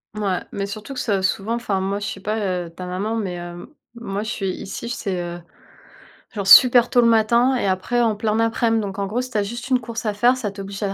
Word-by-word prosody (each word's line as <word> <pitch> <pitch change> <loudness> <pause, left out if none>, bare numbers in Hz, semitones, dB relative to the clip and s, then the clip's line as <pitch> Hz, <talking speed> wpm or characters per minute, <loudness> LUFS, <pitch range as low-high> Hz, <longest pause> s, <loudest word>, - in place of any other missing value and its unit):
Ouais, 200 -4 -1
mais 200 0 -3
surtout 215 +6 -7
que 255 - -5
c'est 200 -5 0
souvent 220 +4 0
enfin, 205 -5 -2
moi, 200 +1 -2
je 205 - -5
sais 195 - -5
pas, 215 +3 -2 0.3
heu, - - -11
ta 180 +2 -9
maman 195 +5 -3
mais 200 -5 -2
hem, 175 0 -7 0.3
moi, 205 -4 -4
je 220 - -4
suis 195 -5 -2
ici, 215 +5 -6
j 235 - -3
c'est, 190 -6 -3
heu, 175 0 -5 0.9
genre, 200 -2 -3
super 245 +2 +8
tôt 245 - +5
le 235 - +4
matin 235 +3 +3
et 245 - -1
après, 190 +6 0
en 225 -3 +2
plein 215 +1 -1
aprem, 225 0 +1
donc 200 -1 -4
en 195 - -1
gros, 235 +5 -1
si 255 0 -7
tu 215 - 0
as - - +2
juste 235 +5 -6
une 255 -1 +3
course 230 +1 -6
à 210 - 0
faire, 240 +5 +3
ça 210 -6 -3
t'oblige 195 0 -7
à 195 -1 -1
210 Hz, 260 wpm, -21 LUFS, 195-235 Hz, 0.9 s, super